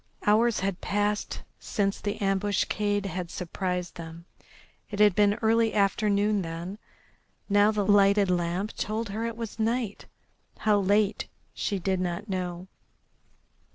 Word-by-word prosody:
Hours 220 +1 +3
had 195 -1 -2
passed 205 +1 -1 0.2
since 200 -1 -1
the 205 -1 -3
ambuscade 205 +1 0
had 180 -2 -4
surprised 180 0 -3
them. 165 0 -9 0.6
It 205 - -5
had 210 -1 +6
been 205 +1 +3
early 225 0 +3
afternoon 205 0 +2
then. 170 +4 -6 0.7
Now 205 +1 +5
the 210 -2 0
lighted 200 -1 +4
lamp 180 +4 -1
told 215 +1 -2
her 220 +3 -2
it 230 -1 -6
was 230 -1 -6
night. 225 -1 -1 0.5
How 210 -1 +3
late 205 +1 +1 0.3
she 200 - -2
did 190 0 -1
not 180 +3 -3
know. 180 -2 -4
205 Hz, 130 wpm, -27 LUFS, 185-210 Hz, 0.7 s, had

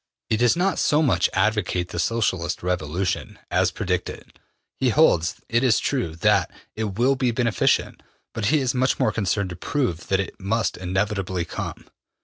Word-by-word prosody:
He 110 - +2
does 120 0 +3
not 185 +2 +1
so 150 +2 +3
much 95 - +2
advocate 95 -3 0
the 85 - -5
Socialist 95 -6 -1
revolution 90 +1 -2
as - - +3
predict - - -2
it. - - -12 0.4
He 130 - +2
holds, 110 - +3
it 115 +2 +1
is 120 -5 +4
true, 120 - -1
that 80 - +2 0.3
it 105 -3 -3
will 130 +3 +3
be 130 -2 +1
beneficent, 115 -1 +1 0.3
but 115 -3 -3
he 150 +4 +3
is 130 -2 0
much 130 0 +1
more 110 - +2
concerned 100 -2 -1
to - - -6
prove 90 - -2
that 95 - +1
it 95 - -4
must 110 +4 -1
inevitably 95 -1 -2
come. - - -6
105 Hz, 170 wpm, -23 LUFS, 90-125 Hz, 0.4 s, is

